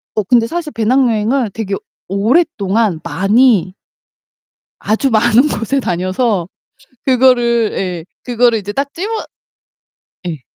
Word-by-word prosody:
어 215 - +1
근데 230 +3 +2
사실 330 +1 -4
배낭여행을 230 0 +1
되게 200 -3 -3 0.3
오랫동안 210 - +1
많이 205 -2 +2 1.1
아주 220 +6 0
많은 240 +4 +4
곳에 230 +2 -1
다녀서 185 -1 -1 0.6
그거를 240 -3 +3
예, 180 -4 -3 0.2
그거를 240 -1 +2
이제 205 0 -6
딱 280 +4 -3
집어 390 +6 -4 1.2
예. 160 -5 -5
230 Hz, 230 characters per minute, -15 LUFS, 200-255 Hz, 1.2 s, 많은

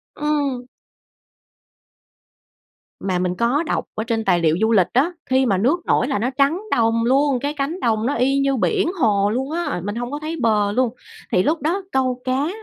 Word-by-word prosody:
Ừm. 285 -4 -1 2.3
Mà 185 -2 -1
mình 180 0 -1
có 245 - +1
đọc - - -2
ở 220 - -2
trên 225 -1 -2
tài 175 - +3
liệu 160 0 +2
du 220 +1 +2
lịch 190 -5 +4
á, 280 +8 +2
khi 260 0 +2
mà 195 -5 +2
nước 290 - +1
nổi - - +2
là 275 - -1
nó 240 +4 0
trắng 285 +7 +2
đồng 230 0 +2
luôn, 270 +1 +2
cái 285 +3 -2
cánh 300 +5 -3
đồng 220 -2 0
nó 275 - +1
y 270 +3 +2
như 275 0 +1
biển 390 - +1
hồ 205 -5 +2
luôn 265 +6 -2
á, 335 - -2
mình 205 +2 -4
hông 245 +1 -4
có 290 - -4
thấy 310 +2 -4
bờ 210 -3 +2
luôn. 250 +2 +1 0.4
Thì 185 - +3
lúc 310 +4 0
đó 345 +7 -1
câu 255 -1 0
cá 260 +3 0
255 Hz, 200 wpm, -21 LUFS, 220-285 Hz, 2.3 s, lịch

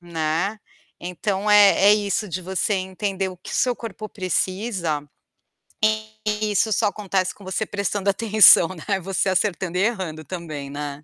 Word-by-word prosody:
Né, 170 +4 -2 0.4
então 190 +3 -2
é 205 -1 +6
é - - +8
isso 205 0 -1
de 185 +2 -4
você 190 +3 -1
entender 190 0 -3
o 185 - -9
que - - -9
seu 250 -1 +1
corpo 215 -2 -8
precisa, 185 -4 -2 1.2
e 210 0 -1
isso 215 +2 +2
só 210 +2 +2
acontece 190 -2 -2
com 200 - -16
você 190 +3 -2
prestando 200 0 -2
atenção, 210 -4 +6
né, 190 +2 -3
você 190 +1 -1
acertando 185 -2 -1
e - - +1
errando 185 -8 -2
também 155 -6 -7
né. 145 0 -6
190 Hz, 150 wpm, -22 LUFS, 175-210 Hz, 1.2 s, é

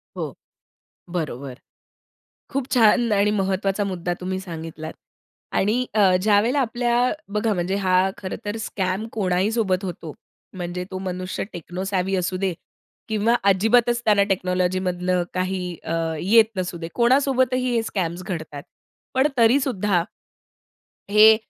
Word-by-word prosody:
हो. - - -4 0.8
बरोबर. 140 -6 -4 0.9
खूप 275 -2 -2
छान 235 -1 +4
आणि 205 +1 +3
महत्वाचा 195 0 0
मुद्दा 180 -3 -2
तुम्ही 185 +1 -3
सांगितलात. 165 -3 -7 0.6
आणि 225 +6 +1
अ, 195 -4 +5
ज्यावेळेला 215 +7 +3
आपल्या 240 0 +1 0.2
बघा 210 +1 +1
म्हणजे 180 +1 -1
हा 185 -1 +3
खरंतर 205 +2 -5
स्कॅम 190 +2 -2
कोणाही 190 -1 +1
सोबत 200 -5 0
होतो. 170 -4 -6 0.4
म्हणजे 175 0 -4
तो 185 - -4
मनुष्य 185 0 -4
टेक्नो 175 +1 -6
सॅव्ही 190 0 0
असू 185 0 -1
दे 190 -1 0 0.5
किंवा 220 +1 +2
अजिबातच 225 +5 +3
त्याला 205 -2 +5
टेक्नॉलॉजीमधलं 180 -1 0
काही 185 0 -1 0.2
अ, 165 - -3 0.3
येत 220 +6 +5
नसू 180 -1 -2
दे. 165 -1 -6
कोणासोबतही 255 0 +2
हे 230 - +3
स्कॅम्स 180 -5 -3
घडतात. 155 -6 -6 0.5
पण 265 +2 +4
तरीसुद्धा, 225 -7 +3 1.1
हे 215 +1 +8
195 Hz, 125 wpm, -23 LUFS, 180-225 Hz, 1.1 s, हे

